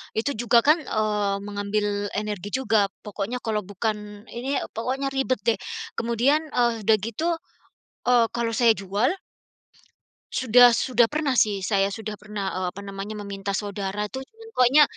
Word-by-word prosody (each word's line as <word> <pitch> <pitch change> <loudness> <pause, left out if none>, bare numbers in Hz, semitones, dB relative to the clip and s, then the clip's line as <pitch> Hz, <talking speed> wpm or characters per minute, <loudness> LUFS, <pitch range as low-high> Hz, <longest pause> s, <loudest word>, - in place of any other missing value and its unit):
itu 230 +6 0
juga 235 0 +4
kan, 305 +3 +5
eee, 210 -4 0
mengambil 205 0 -1
energi 210 -2 -3
juga 220 -6 +2 0.2
pokoknya 210 +4 -4
kalau 220 -2 0
bukan 210 +1 -4
ini, 265 +4 -2 0.2
pokoknya 265 +4 -2
ribet 265 -4 0
deh. 225 -4 +2 0.4
Kemudian, 250 +7 +2
e 250 - 0 0.2
udah 220 +1 +5
gitu, 310 - -1 0.7
eee, 240 -2 +5
kalau 235 -1 0
saya 230 -2 +5
jual 200 +6 0 1.2
sudah 245 0 +6
sudah 245 0 +3
pernah 295 -3 0
sih 210 -2 +3
saya 195 0 +2
sudah 215 0 -5
pernah, 205 -1 -4
eee, 185 0 -1
apa 200 +3 -9
namanya, 200 +2 -6
meminta 200 -1 -4
saudara 200 0 -2
itu 265 +3 -6
cuman 450 +10 -16
pokoknya, 255 +4 +6
215 Hz, 150 wpm, -25 LUFS, 205-250 Hz, 1.2 s, sudah